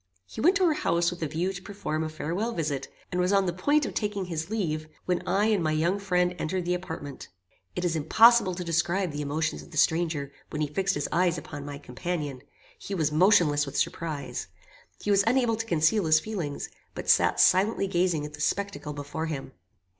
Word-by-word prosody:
He 220 - -7
went 360 +8 +5
to 380 -2 +3
her 325 - +4
house 170 - +1
with 175 - -8
a 160 - 0
view 170 +6 -1
to 180 - -7
perform 195 -6 -3
a 160 - -3
farewell 175 +9 -3
visit, 145 -6 -2 0.2
and 180 -1 0
was 180 +1 +1
on 195 -1 +3
the 175 - -1
point 290 - +2
of - - -5
taking 205 -3 -2
his 165 -1 -4
leave, 160 -8 -2 0.2
when 180 -1 0
I 205 +2 +2
and 205 -5 +2
my 155 -1 +1
young 170 +6 +1
friend 180 -2 +1
entered 180 +2 -2
the 180 - +1
apartment. 160 -6 -6 0.5
It 180 - -2
is 170 -2 +1
impossible 190 +5 +5
to 180 - -4
describe 170 +2 0
the 145 0 -4
emotions 155 +2 -2
of - - -14
the 155 - -9
stranger, 160 -3 +1 0.2
when 150 - -5
he - - 0
fixed 195 +3 +1
his 145 - -1
eyes 175 +1 +2
upon 145 -1 -7
my 145 -1 -6
companion. 145 0 -4 0.4
He 200 - -5
was 155 -4 +1
motionless 155 -4 +4
with 140 - -5
surprise. 155 -4 -2 0.5
He 205 - -1
was 200 0 +5
unable 240 -1 +3
to 225 +1 -4
conceal 170 +4 +2
his 155 0 +6
feelings, 165 -6 -4 0.3
but - - -6
sat - - +4
silently 195 +2 +4
gazing 175 -5 +1
at 150 - -8
the 150 - -8
spectacle 200 -4 -2
before 145 +3 -4
him. 145 -4 -5
175 Hz, 210 wpm, -27 LUFS, 155-195 Hz, 0.5 s, his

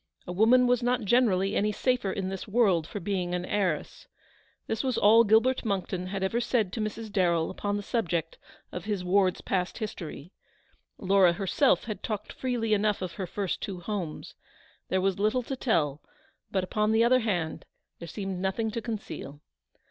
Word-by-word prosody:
A - - -5
woman 230 +7 +5
was 245 -1 +2
not 245 0 +1
generally 205 -3 +2
any 210 +1 +2
the - - -9
safer 250 -6 +1
in 190 -1 -3
this 195 +3 -6
world 200 -7 +2
for 205 - -5
being 180 -2 -2
an 180 0 -3
heiress. 185 -6 -2 0.6
This 220 +3 -2
was 260 -2 0
all 225 +3 +6
Gilbert 225 +4 +3
Monckton 190 -4 -2
had 195 0 -3
ever 210 +5 0
said 225 -6 0
to - - -3
Mrs. 215 +1 -4
Darrell 175 -5 +1
upon 205 0 -2
the 205 - -5
subject 170 -8 -2 0.3
of 180 - -6
his 205 -4 -2
ward's 185 0 +2
past 180 -1 -2
history. 180 - -6 0.7
Laura 190 -2 +4
herself 200 +9 +2
had 215 -4 -5
talked 210 -2 -4
freely 240 -4 -1
enough 210 -1 +1
of 180 - -4
her 190 0 -5
first 195 0 -3
two 190 -3 -5
homes. 175 -4 -5 0.6
There 185 - +1
was 195 0 0
little 215 +5 +1
to 270 - -4
tell, 155 - 0 0.5
but, 190 -2 0
upon 210 +3 0
the 225 +1 +4
other 255 +2 +5
hand, 175 -8 -2 0.4
there 170 - -8
seemed 195 +1 -4
nothing 195 +4 -1
to 230 +1 -3
conceal. 210 - -6
200 Hz, 180 wpm, -28 LUFS, 185-225 Hz, 0.7 s, all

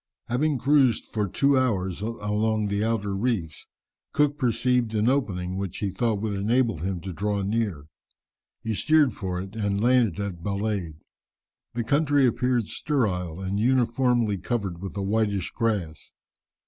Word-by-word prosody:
Having 140 +4 +1
cruised 135 -3 +3
for 105 -2 -2
two 140 +9 +2
hours 100 -8 0
along 110 -1 -1
the 100 +1 0
outer 105 -3 -1
reefs, 95 -8 -2 0.5
Cook 150 -1 +2
perceived 125 -2 +1
an 105 +1 +2
opening 95 -9 0
which 95 -3 -4
he 100 -2 -2
thought 110 +2 0
would 110 -2 -1
enable 115 - +1
him 90 +1 -3
to 95 0 -6
draw 100 +2 -1
near. 100 -8 -1 0.8
He 110 - -1
steered 150 +2 +3
for 95 -3 -4
it 95 +3 -7
and 100 -2 -1
landed 120 -5 +3
at 100 -4 -4
Balade. 100 -4 -2 0.8
The 120 - 0
country 145 +2 +3
appeared 125 -1 +1
sterile, 95 - -1
and 95 +1 -2
uniformly 120 -3 +2
covered 95 -4 -3
with 95 +1 -6
a 100 - -1
whitish 100 -2 0
grass. 100 -9 -2
110 Hz, 150 wpm, -25 LUFS, 95-125 Hz, 0.8 s, cruised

